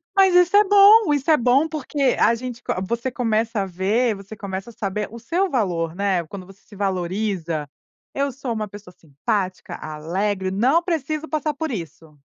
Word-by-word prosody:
Mas 385 -2 +5
isso 360 +2 +5
é 415 - +8
bom, 410 -1 +7
isso 290 +2 +1
é 305 - +6
bom, 255 +6 +3
porque 285 -3 0
a 235 - +4
gente 245 0 -7
co - - -2
você 235 +2 -2
começa 225 -2 0
a - - -1
ver, 200 +6 0
você 200 +2 -10
começa 195 +2 -6
a - - -13
saber 210 -1 -3
o 235 - -9
seu 355 - 0
valor, 175 - -1
né, 195 -3 0
quando 185 0 -9
você 195 +1 -17
se 205 - -16
valoriza, 185 -4 -2 0.5
"Eu 280 0 -1
sou 250 -2 -4
uma 215 -1 -3
pessoa 200 -2 -12
simpática, 185 - -3
alegre, 185 +6 -3
não 260 - +2
preciso 315 -2 -2
passar 305 -1 -2
por 315 +1 -3
isso". 165 - -8
220 Hz, 185 wpm, -22 LUFS, 190-280 Hz, 0.5 s, é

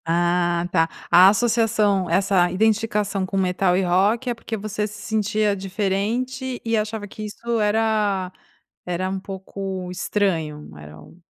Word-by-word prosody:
Ah 175 +1 +1
tá, 165 -2 +2 0.2
a 185 +2 +8
associação, 215 -3 +2
essa 180 0 +2
identificação 210 0 +1
com 190 +1 -3
metal 185 -1 +2
e 190 - +1
rock 205 +8 +2
é - - 0
porque 230 -1 -6
você 210 0 -3
se 210 0 -10
sentia 215 -1 0
diferente 215 +7 -2
e 230 0 +1
achava 215 -1 -2
que 215 - -9
isso 230 +2 -3
era 210 -3 +1 0.5
era 180 +1 -2
um 190 +1 -3
pouco 190 -1 -6
estranho, 170 -6 -2
era 75 0 -12
um 165 - -17
195 Hz, 145 wpm, -22 LUFS, 180-215 Hz, 0.5 s, a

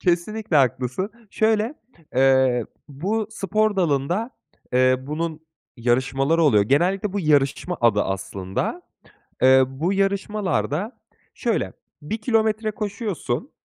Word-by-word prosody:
Kesinlikle, 180 +1 0
haklısın. 130 - +1 0.2
Şöyle, 220 +4 +1 0.4
eee, 130 -2 +3 0.2
bu, 195 +10 -2
spor 215 0 0
dalında, 175 - 0 0.4
eee, 130 0 +4
bunun 155 +3 -4 0.4
yarışmaları 135 +6 +1
oluyor. 105 -9 +5
Genellikle 185 - +1
bu 205 - -1
yarışma 150 +2 +1
adı 110 -3 +4
aslında. 95 - -3 0.6
Eee, 130 0 +7
bu 155 +8 -2
yarışmalarda 195 - -1 0.3
şöyle, - - -1 0.3
1 215 +10 -4
kilometre 220 -1 +1
koşuyorsun 210 -2 -4
165 Hz, 100 wpm, -23 LUFS, 130-210 Hz, 0.6 s, Eee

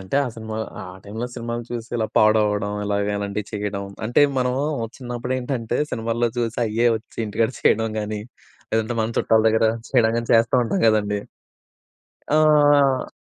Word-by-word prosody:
అంటే, 95 +8 -3
ఆ - - -3
సినిమా 110 -1 -6 0.2
ఆ - - -6 0.2
టైంలో 110 +4 -5
సినిమాలు 120 0 -4
చూసి 120 -1 -5
ఇలా 110 -2 0
పాడవడం. 105 -1 +3
ఇలాగ 100 0 0
ఇలాంటియి 100 0 -3
చెయ్యడం. 100 -1 -3 0.2
అంటే, 120 +5 +4 0.2
మనం 125 0 +1 0.4
చిన్నప్పుడేంటంటే, 125 -1 -3
సినిమాల్లో 115 +1 0
జూసి 120 0 -1
అయ్యే 115 +2 +1
ఒచ్చి 110 - -14
ఇంటికాడ 110 +2 0
చెయడం 115 +1 +3
గానీ, 105 0 -4 0.5
లేదంటే 110 +2 0
మన 110 +1 -2
చుట్టాల 110 0 +3
దగ్గర 110 0 +2 0.3
చెయనీ 115 -4 +4
గానీ 115 0 -3
చేస్తా 115 0 +3
ఉంటాం 185 +11 -1
గదండీ. 105 -1 +1 1.1
ఆ! 145 -3 +4
115 Hz, 145 wpm, -22 LUFS, 105-120 Hz, 1.1 s, అంటే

